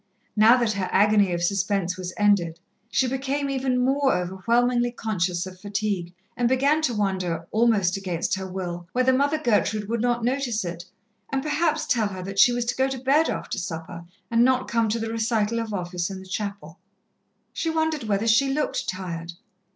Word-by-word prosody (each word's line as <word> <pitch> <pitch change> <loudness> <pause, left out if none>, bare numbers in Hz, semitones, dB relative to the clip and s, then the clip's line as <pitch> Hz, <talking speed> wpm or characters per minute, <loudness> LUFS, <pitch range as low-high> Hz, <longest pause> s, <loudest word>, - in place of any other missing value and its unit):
Now 225 +3 +6
that 235 -3 +1
her 195 -3 -2
agony 205 -1 +4
of 170 0 -1
suspense 195 -1 0
was 185 -1 -5
ended, 190 -6 +2 0.3
she 260 - +2
became 275 +2 -2
even 260 -1 0
more 270 +1 +2
overwhelmingly 235 +7 +1
conscious 180 -6 -1
of 185 -1 -10
fatigue, 200 -3 -3 0.2
and 240 -1 +1
began 280 +4 +3
to 250 -7 0
wonder, 185 -5 -1
almost 215 -5 +2
against 180 -4 -2
her 190 0 -2
will, 175 -2 -5
whether 255 +1 +3
Mother 285 +4 +2
Gertrude 215 -6 +1
would 230 0 -1
not 240 -1 0
notice 245 -4 -1
it, 170 0 -6 0.5
and 270 -1 -1
perhaps 310 +1 0
tell 225 -4 +1
her 190 -2 -6
that 195 +1 -4
she 245 - +7
was 240 0 -1
to 245 - -1
go 265 0 +2
to 265 0 -3
bed 275 +5 +2
after - - -3
supper 170 0 -6 0.3
and 230 0 +4
not 255 0 +2
come 230 -1 +1
to 220 - 0
the 225 0 -3
recital 225 0 0
of 225 -1 -4
Office 180 -2 -3
in 195 - -6
the 190 - -11
chapel. 200 -4 -5 0.7
She 330 - -2
wondered 320 -4 0
whether 205 0 0
she 235 +5 +3
looked 300 +2 -1
tired. 175 -3 -5
215 Hz, 185 wpm, -24 LUFS, 185-250 Hz, 0.7 s, she